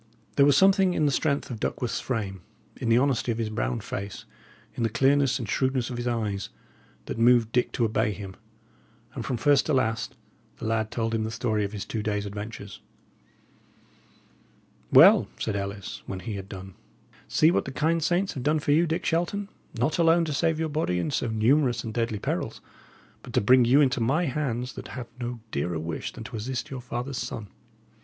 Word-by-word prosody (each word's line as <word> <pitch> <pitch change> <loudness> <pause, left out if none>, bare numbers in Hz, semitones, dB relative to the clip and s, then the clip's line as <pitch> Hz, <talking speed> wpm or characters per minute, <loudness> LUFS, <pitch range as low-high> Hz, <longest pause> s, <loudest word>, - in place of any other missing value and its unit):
There 140 0 +6
was 145 -1 +5
something 190 -1 +4
in 155 - +2
the 145 - +3
strength 140 -1 0
of 115 - -5
Duckworth's 120 +2 -2
frame, 100 -7 -3 0.3
in 115 - -3
the 115 - +5
honesty 130 -2 +1
of 115 - -2
his 110 -2 -2
brown - - -2
face, 100 0 -6 0.5
in - - -5
the 115 - +2
clearness 135 +3 +3
and 120 -5 -5
shrewdness 130 +2 0
of 120 - -4
his 120 +1 -3
eyes, 105 -5 -2 0.6
that - - -5
moved 115 -1 +5
Dick 125 0 +1
to 120 - +1
obey 110 0 +1
him; 100 -2 -7 0.8
and 120 - -5
from 125 -1 -2
first 145 +3 +3
to 155 - +1
last 115 -3 0 0.4
the - - -7
lad 110 -1 0
told 115 0 -2
him 110 -1 0
the 110 - -2
story 110 -1 -1
of 100 - -3
his 105 -2 -5
two 110 - -3
days' 105 -1 -1
adventures. 100 0 -7 2.1
"Well," - - +8
said 110 - -2
Ellis, 100 0 -5
when 95 -1 -5
he 115 +1 -5
had 100 -1 -6
done, 95 -1 -8 0.5
"see 155 +2 +4
what - - +1
the 135 - -5
kind 160 +4 +1
saints 180 +4 +1
have 130 - -5
done 150 +4 +2
for 145 -1 0
you, 165 +4 +4
Dick 165 +2 -2
Shelton, 185 +5 -1 0.3
not 150 +9 0
alone 165 0 +4
to 155 - -3
save 160 +2 +1
your 160 -1 -1
body 145 - 0
in 90 - -1
so 125 - 0
numerous 120 +2 +2
and 110 - -5
deadly 115 -2 -1
perils, - - -3 0.6
but - - -11
to - - +4
bring 125 +4 +5
you 135 +5 +5
into 130 -3 +2
my 145 +10 +2
hands 125 -3 -2
that - - -8
have 120 -2 -6
no 120 -1 -4
dearer 80 +4 -1
wish 80 +1 -4
than 115 - -9
to 115 - -7
assist 120 +4 -4
your 130 -2 -5
father's 125 +1 -4
son. 105 -3 -5
120 Hz, 200 wpm, -26 LUFS, 110-140 Hz, 2.1 s, Well